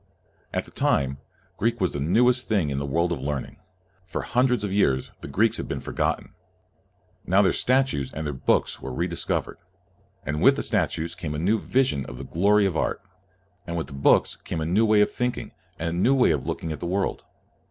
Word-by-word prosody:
At - - -2
that - - -17
time, 70 0 +1 0.4
Greek 115 +3 0
was 90 -3 +1
the 70 - -4
newest 120 - +3
thing 95 -10 +1
in 70 - -1
the 70 - -3
world 85 +5 +1
of 80 - -2
learning. 70 -1 -4 0.5
For 90 - -5
hun 125 +2 +2
dreds 125 -4 0
of 100 -2 -2
years, 70 -10 +1
the - - -8
Greeks 105 +11 +2
had - - -4
been - - -3
for - - -7
gotten. - - -1 0.9
Now 95 +3 +4
their 95 - +3
statues 130 - +1
and 80 +1 -5
their 75 - -2
books 65 - 0
were 65 - -5
re 85 +7 -1
discovered; 85 -2 -3 0.7
and 75 0 -2
with - - +6
the - - -2
statues 85 +1 -1
came 85 -4 -5
a - - -2
new 100 +8 +1
vision 125 - 0
of - - -8
the 70 - -7
glory 100 +8 +3
of 95 -4 0
art, 90 - -1 0.6
and 85 0 -3
with 80 - -2
the 70 - -12
books 70 0 +3
came 85 - -5
a 80 - -2
new 100 +7 +3
way 105 -1 +5
of 105 - +3
thinking 125 0 -3 0.3
and 85 - -2
a - - -3
new 130 +8 +4
way 125 -9 +4
of 75 -4 -2
looking 80 - -3
at 75 - -5
the 85 - -4
world. 95 +2 -1
85 Hz, 220 wpm, -25 LUFS, 75-105 Hz, 0.9 s, with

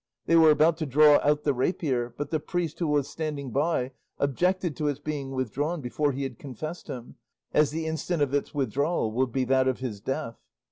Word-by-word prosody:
They 165 - +3
were 160 -1 +7
about 155 +2 +4
to 155 -2 -3
draw 145 +2 +6
out 150 +1 +2
the 145 - +2
rapier, 130 -3 -1
but 145 0 -4
the 155 - +1
priest 170 -1 -3
who 170 - 0
was 145 -2 +1
standing 150 -5 -4
by 140 -1 0 0.3
objected 175 +4 0
to 150 - -1
its 145 -1 -1
being 145 -2 -4
withdrawn 135 +6 -2
before 145 +2 0
he 140 +1 -3
had 135 - -5
confessed 155 +6 -7
him, 125 -2 -8 0.4
as 150 -2 +4
the 160 +2 -3
instant 160 0 -1
of 140 -1 -2
its 145 - 0
withdrawal 140 -1 0
would 125 +2 0
be 130 +2 0
that 130 +1 +3
of 130 - 0
this 120 -6 -4
death. 115 0 -4
145 Hz, 205 wpm, -27 LUFS, 130-155 Hz, 0.4 s, were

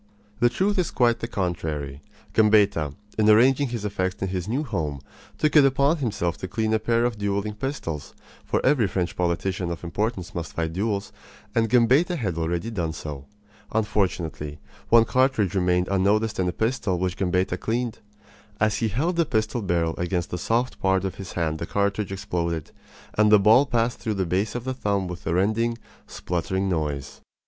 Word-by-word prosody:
The 120 - +5
truth 195 +9 0
is 175 - +1
quite 120 -2 +2
the 115 - -3
contrary. 80 - -3 0.3
Gambetta, 100 -9 +3 0.2
in 110 0 +4
arranging 130 +6 +5
his 115 -4 -4
effects 95 -2 -2
in 95 - -1
his 90 -1 -3
new 130 +7 -1
home, 80 - -3 0.4
took 155 0 +1
it 150 - +8
upon 140 +4 +3
himself 100 - -1
to 95 - -5
clean 110 +2 -1
a 110 - +3
pair 115 +1 +1
of 120 -3 -2
dueling 100 +1 -1
pistols; 105 - -5 0.3
for - - -1
every 130 -6 +4
French 90 -1 -2
politician 90 +1 -1
of 85 0 -5
importance 95 +2 -3
must 85 -4 -5
fight 80 -1 -2
duels, 100 +1 -2 0.4
and 115 -1 +2
Gambetta 130 - +4
had 100 - -2
already 85 +6 -2
done 85 -7 -2
so. 75 -4 -7 0.5
Unfortunately, 90 -8 -1 0.3
one 115 0 +7
cartridge 130 -7 +2
remained 90 -1 +2
unnoticed 100 +3 +1
in 90 - +1
the - - +1
pistol 110 -2 -1
which 90 0 -1
Gambetta 90 -1 0
cleaned. 115 0 -2 0.6
As 110 -1 +2
he 115 - 0
held 155 - -1
the 170 - +3
pistol 110 0 0
barrel 85 -4 0
against 90 -1 -1
the 90 - -3
soft 120 +7 0
part 95 0 +1
of 95 - -2
his 95 - -8
hand 80 -2 -1
the 85 - -4
cartridge 100 0 0
exploded, 85 -5 -3 0.4
and 105 0 +4
the 105 - +9
ball 110 +7 +5
passed 120 -2 0
through 110 -2 -2
the 95 -1 0
base 95 +7 -1
of 120 - -3
the 130 +1 -2
thumb 100 -6 -1
with 90 -2 -7
a 80 - +1
rending, 110 +5 +1 0.3
spluttering 95 +3 -2
noise. 75 -6 -3
100 Hz, 180 wpm, -25 LUFS, 90-115 Hz, 0.6 s, the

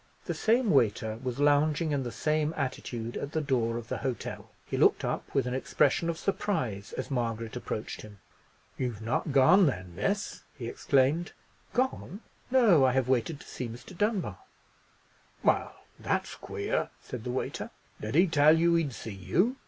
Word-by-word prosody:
The - - -2
same 230 0 +2
waiter 110 -4 +2
was 125 -2 -3
lounging 145 +2 +3
in 140 -2 +1
the 120 -2 -4
same 155 +3 0
attitude 120 -3 -3
at 140 - -5
the 160 - +1
door 120 -6 0
of 115 -1 -7
the - - -3
hotel. 130 -4 -4 0.2
He - - -4
looked - - +4
up - - -3
with 135 -3 +3
an 125 - -2
expression 150 +5 +1
of 165 - -2
surprise 145 - -2
as - - -5
Margaret 115 -3 -2
approached 110 -3 -4
him. 105 -1 -12 0.6
"You've 120 -4 -3
not 120 +6 -1
gone, 160 +8 +6
then, 90 -9 -3
miss?" 200 - -1 0.2
he 120 -4 -5
exclaimed. 140 - +1 0.4
"Gone! 245 -5 -1 0.3
No! 230 - +5
I 130 -1 +4
have 130 -1 +1
waited 130 +4 +1
to - - -14
see 125 - -5
Mr. 120 +11 -10
Dunbar!" 190 - -1 1.0
"Well, - - +2 0.3
that's - - -1
queer," - - -2
said 125 -3 -7
the 125 - -4
waiter; 125 +1 -3 0.3
"did 110 +5 -4
he 175 +4 +7
tell 155 -2 +5
you 170 +1 +4
he'd 165 -6 +1
see 110 -2 -7
you?" 180 - +1
135 Hz, 170 wpm, -29 LUFS, 120-165 Hz, 1.0 s, he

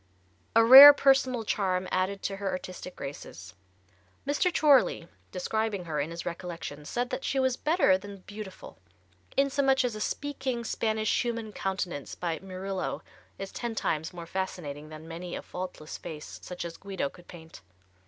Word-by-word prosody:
A 230 0 +6
rare 275 +4 +13
personal 265 -4 +3
charm 185 -3 -1
added 190 +2 -1
to 195 - -3
her 200 -1 -2
artistic 185 0 -6
graces. 95 - -8 0.7
Mr. 290 +6 +1
Chorley 280 - +4 0.2
describing 205 0 -2
her, 155 -3 -3
in 145 +3 -1
his 170 0 -7
recollections, 170 -4 -6
said 245 +1 -2
that - - -3
she 270 - 0
was 260 -1 +2
better 300 - +3
than 200 0 -10
beautiful, 205 - -10 0.6
insomuch 270 -1 +3
as 240 - -1
a 215 - -6
"speaking 265 -4 -3
Spanish 220 -1 0
human 230 -3 -4
countenance 185 -8 -4
by 170 -3 -3
Murillo 190 0 -4 0.3
is 195 0 -6
ten 235 -2 -4
times 160 -5 -1
more 175 -2 -8
fascinating 165 -5 -5
than 155 +1 -10
many 175 +2 -6
a - - -6
faultless 180 -4 -7
face 150 -2 -8
such 180 -1 -6
as 170 -1 -7
Guido 195 -6 -3
could 175 +5 -15
paint." 165 -2 -12
190 Hz, 155 wpm, -28 LUFS, 170-235 Hz, 0.7 s, rare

